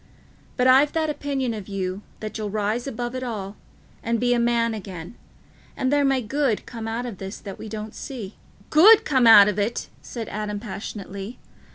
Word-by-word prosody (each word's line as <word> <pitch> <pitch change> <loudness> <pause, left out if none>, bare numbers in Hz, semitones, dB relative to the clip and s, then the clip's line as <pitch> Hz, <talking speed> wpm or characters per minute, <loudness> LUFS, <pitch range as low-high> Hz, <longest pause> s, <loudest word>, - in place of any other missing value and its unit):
But 250 - +2
I've 270 +3 +5
that 315 -2 0
opinion 275 -4 -2
of 210 -4 -7
you, 190 -1 -3 0.2
that 215 0 -6
you'll 215 -2 -3
rise 215 +4 -1
above 240 -1 -4
it 255 - -4
all 210 -5 -5 0.5
and 230 0 -1
be 245 +1 +2
a 240 - +2
man 235 -1 +2
again, 185 -3 -7 0.6
and 260 +2 0
there 290 0 +3
may 270 -2 +2
good 265 -1 0
come 225 -2 -7
out 230 +2 -3
of 230 -6 -7
this 195 +1 -6
that 195 -3 -9
we 220 - -7
don't 215 0 -6
see." 225 -8 -7 0.4
"Good 400 +8 +8
come 260 -5 +3
out 205 -3 +10
of 210 0 -1
it!" 210 +4 -2
said 230 -3 -6
Adam 210 -1 -4
passionately. 200 0 -7
225 Hz, 190 wpm, -24 LUFS, 205-255 Hz, 0.6 s, out